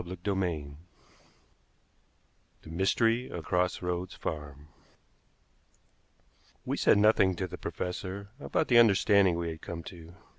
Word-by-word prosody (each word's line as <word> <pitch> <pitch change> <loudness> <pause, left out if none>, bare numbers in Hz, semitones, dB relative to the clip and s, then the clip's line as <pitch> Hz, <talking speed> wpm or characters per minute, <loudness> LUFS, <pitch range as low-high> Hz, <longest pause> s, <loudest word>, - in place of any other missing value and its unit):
CHAPTER 90 +3 -4
VIII 80 -7 -3 1.9
THE 80 - -11
MYSTERY 115 +7 +1
OF 85 -3 -7
CROSS 90 0 0
ROADS 90 +1 -3
FARM 75 -1 -6 2.0
We - - -1
said - - +4
nothing 105 -3 +4
to 95 - -3
the 90 - -8
professor 95 +2 -5
about - - -1
the 120 -2 +6
understanding 100 -4 +4
we 85 -1 -2
had 80 -1 -8
come 85 -1 -7
to. 85 -1 -12
90 Hz, 120 wpm, -29 LUFS, 85-100 Hz, 2.0 s, the